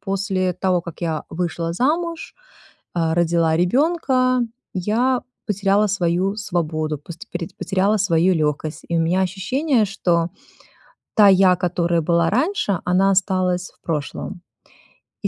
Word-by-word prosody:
после 195 -2 -1
того, 180 0 0
как 170 -2 -10
я 160 -3 -2
вышла 170 -1 -2
замуж, 325 - -1 0.6
э, 165 -1 +1
родила 170 -1 +2
ребёнка, 255 - +2 0.3
я 235 +7 +1 0.2
потеряла 205 0 +2
свою 185 +1 0
свободу, 155 -7 -2
посте 165 +4 -11
пореть 175 -1 -5
потеряла 195 +3 +1
свою 185 -1 +3
лёгкость. 155 0 -2
И 170 - 0
у - - +2
меня 175 +3 +1
ощущение, 225 - 0
что 175 -3 0 0.9
та 210 -2 +7
я, 190 -1 +5
которая 175 -1 0
была 170 +1 +2
раньше, 255 - 0
она 190 +2 +3
осталась 185 -2 0
в - - -36
прошлом. 165 +4 -4 0.8
И - - +2
185 Hz, 130 wpm, -21 LUFS, 170-205 Hz, 0.9 s, та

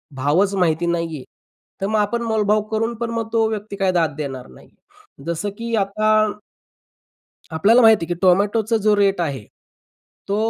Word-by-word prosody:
भावच 155 +10 +1
माहिती 170 -2 +1
नाहीये, 165 -5 -2 0.6
तर 195 - 0
मग 215 0 0
आपण 235 +3 -1
मोलभाव 215 -2 +1
करून 225 +2 -1
पण 235 0 -3
मग 230 -1 -3
तो 225 -1 +2
व्यक्ती 210 -1 -5
काय 195 -2 +1
दाद 165 -4 0
देणार 135 -4 -6
नाही. - - -17 0.6
जसं 170 +5 -2
की 230 0 -3
आता 215 +1 0 1.4
आपल्याला 205 +10 +4
माहिती 220 -7 +5
आहे 175 - -2
की 175 - -11
टोमॅटोचा 205 +5 +2
जो 215 -1 +4
रेट 200 -3 +1
आहे 140 -8 -3 0.9
तो 200 - 0
200 Hz, 160 wpm, -20 LUFS, 170-220 Hz, 1.4 s, माहिती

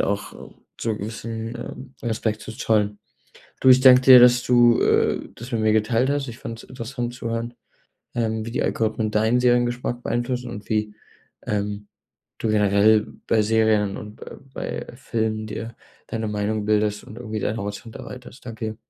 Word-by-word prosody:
auch 100 +1 -1 0.5
so 115 - -1
'n 105 - -5
gewissen, 115 +2 -5
ähm, 130 +2 -9
Respekt 110 -2 -2
zu - - -8
zollen. 105 -3 0 0.6
Du, 130 - +6
ich 130 0 +7
danke 130 -1 +8
dir, 130 -1 +9
dass 125 0 +6
du, 120 -1 +5
äh, - - +2
das 120 +3 -10
mit 115 -2 0
mir 110 0 +3
geteilt 115 +4 +2
hast. 145 -1 -1
Ich 120 -1 -8
fand 115 0 -7
es - - -17
interessant 120 -1 -5
zu 115 - -5
hören, 115 +1 -3 0.6
ähm, 110 -2 -1
wie 115 - -6
die 135 - -1
Algorithmen 110 -1 -1
deinen 110 +3 +2
Seriengeschmack 120 0 +1
beeinflussen 120 +1 -2
und 105 0 -8
wie, 105 -1 0 0.5
ähm, 105 0 -3 0.5
du 110 - -1
generell 105 +1 +4 0.2
bei 110 - +3
Serien 110 -2 +2
und 105 0 -9
be - - -11
bei - - -5
Filmen 110 -3 -2
dir 115 +1 -6 0.3
deine 110 -1 -3
Meinung 105 0 -2
bildest 105 -1 +1
und 105 - -11
irgendwie 110 -3 -5
deinen 110 +2 -2
Horizont 105 +2 -6
erweiterst. 125 +1 -10
Danke 115 -1 -6
dir. 110 0 -4
110 Hz, 175 wpm, -23 LUFS, 105-120 Hz, 0.6 s, dir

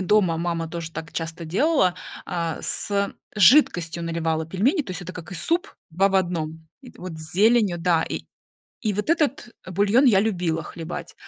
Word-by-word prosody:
дома 185 -3 +2
мама 165 -1 -2
тоже 165 0 -6
так 165 0 -7
часто 165 0 -5
делала: 185 - +2 0.3
а, 170 -3 -2
с 200 0 0 0.2
жидкостью 175 - +4
наливала 165 -1 -1
пельмени, 225 - +1
то 210 - -9
есть 180 0 -5
это 180 +1 -7
как 180 0 -9
и - - -5
суп 335 - 0 0.2
2 190 +5 +2
в 195 - -4
1. 160 -3 -2
И 255 -3 -13
т - - -21
вот 180 -1 -6
с 155 0 -7
зеленью, 210 -2 +3
да, 165 -1 +2
и - - -4 0.6
и 215 -4 0
вот 210 +9 -3
этот 300 -7 +1 0.2
бульон 205 +8 +3
я 205 -7 +5
любила 175 -6 -1
хлебать. 165 +1 -7
180 Hz, 180 wpm, -24 LUFS, 165-210 Hz, 0.6 s, я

